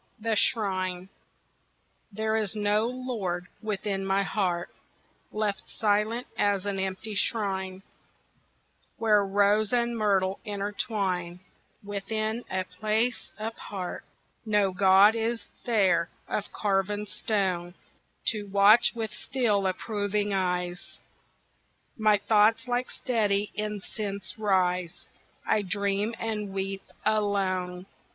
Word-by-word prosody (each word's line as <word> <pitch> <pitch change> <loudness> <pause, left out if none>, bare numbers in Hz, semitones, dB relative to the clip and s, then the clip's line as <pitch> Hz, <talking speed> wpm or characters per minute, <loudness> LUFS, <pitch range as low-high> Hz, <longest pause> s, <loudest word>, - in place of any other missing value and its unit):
The 225 0 0
Shrine 185 -4 +1 1.0
There 220 +2 -1
is 220 -2 0
no 210 +1 +2
lord 230 -9 -3 0.2
within 200 -2 -2
my 195 +1 +2
heart, 180 -2 -1 0.6
Left 210 -2 -1
silent 215 +3 +1
as 200 -1 +1
an 200 -1 -1
empty 190 +3 -3
shrine 190 -2 -1 1.1
Where 215 -2 +4
rose 205 +2 +3
and 240 -1 +1
myrtle 195 -3 +1
intertwine, 200 -4 -2 0.4
Within 215 +3 -2
a 190 0 -1
place 215 +6 -1
apart. 210 -4 -5 0.4
No 210 -3 +2
god 195 +2 +6
is 230 +1 -1 0.2
there 185 -8 +3 0.2
of 205 - -3
carven 205 0 0
stone 190 -4 -1 0.5
To 210 -3 -2
watch 200 +3 +6
with 220 -2 -3
still 215 -6 0
approving 205 +1 -1
eyes 180 -2 -2 1.0
My 215 -2 +4
thoughts 220 +3 +3
like 245 +1 -1
steady 210 -5 0
incense 205 -2 -4
rise; 180 -4 +1 0.4
I 215 - +2
dream 200 +3 -1
and 210 -3 -3
weep 195 0 -3 0.2
alone. 185 -4 0
205 Hz, 100 wpm, -28 LUFS, 190-215 Hz, 1.1 s, god